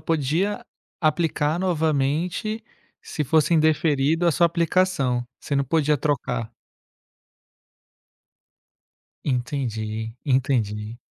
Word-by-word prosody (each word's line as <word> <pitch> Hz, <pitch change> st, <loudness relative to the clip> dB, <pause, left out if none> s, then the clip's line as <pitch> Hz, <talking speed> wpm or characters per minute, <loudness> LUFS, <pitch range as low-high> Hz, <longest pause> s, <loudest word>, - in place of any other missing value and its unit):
podia 165 Hz, +6 st, 0 dB, 0.4 s
aplicar 155 Hz, -1 st, +1 dB
novamente 165 Hz, +5 st, 0 dB, 0.4 s
se 155 Hz, -, -3 dB
fosse 155 Hz, +3 st, +2 dB
indeferido 155 Hz, 0 st, +2 dB
a 170 Hz, -, +4 dB
sua 170 Hz, -, +4 dB
aplicação, 170 Hz, -7 st, +1 dB, 0.2 s
você 145 Hz, -, -4 dB
não 140 Hz, -, +2 dB
podia 150 Hz, +1 st, +2 dB
trocar. 120 Hz, -5 st, -1 dB, 2.7 s
Entendi, 115 Hz, -4 st, -2 dB
entendi. 120 Hz, -5 st, 0 dB
150 Hz, 80 wpm, -24 LUFS, 130-165 Hz, 2.7 s, a